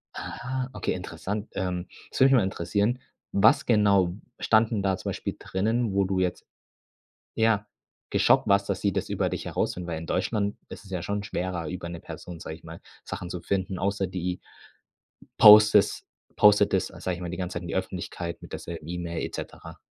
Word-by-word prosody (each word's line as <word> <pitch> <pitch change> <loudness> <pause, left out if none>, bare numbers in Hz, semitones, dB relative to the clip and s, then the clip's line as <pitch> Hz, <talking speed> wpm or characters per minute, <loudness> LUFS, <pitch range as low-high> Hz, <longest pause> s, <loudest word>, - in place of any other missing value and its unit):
Aha, 130 +1 -4
okay, - - -2
interessant, 105 +2 -5
ähm, 90 -1 -2 0.2
das - - -6
würde 135 +1 +6
mich 130 - +7
mal - - +1
interessieren. 100 +6 0 0.3
Was 100 - +4
genau 100 -5 +3 0.2
stand 110 +1 +3
denn 105 -4 -1
da 95 -2 +1
zum - - -5
Beispiel - - -4
drinnen, 110 +3 0
wo 100 0 +3
du 95 0 0
jetzt 90 -1 -1 0.9
ja, 110 -2 +2 0.4
geschockt - - +4
warst, 100 0 +3
dass 100 - -1
sie 100 - +1
das 95 0 -2
über - - 0
dich - - -5
herausfinden, 90 -1 -2
weil 80 -2 -3
in 80 - -7
Deutschland 100 -2 -1
ist - - -10
es 95 - -14
ja 90 -3 -3
schon 100 +2 -2
schwerer, 90 -5 -3
über 90 -1 -5
'ne 85 0 -6
Person, 85 0 -9
sage 80 - -6
ich - - -21
mal, 80 +1 -10 0.2
Sachen 90 0 -6
zu 90 - -4
finden, 95 -1 -2
außer 100 +1 0
die 90 -1 -3 1.0
postet- 105 -2 +8 0.3
postet 105 0 +6
es, - - +2
sage 90 -1 -4
ich 90 - -10
mal, 90 - -4
die 90 - -5
ganze 90 -2 -4
Zeit 85 - -2
in 85 - -7
die - - -4
Öffentlichkeit 90 -2 -4
mit - - -12
derselben 80 -2 -7
E-Mail 85 -1 -4
et - - -4
cetera. - - -8
95 Hz, 195 wpm, -27 LUFS, 90-105 Hz, 1.0 s, postet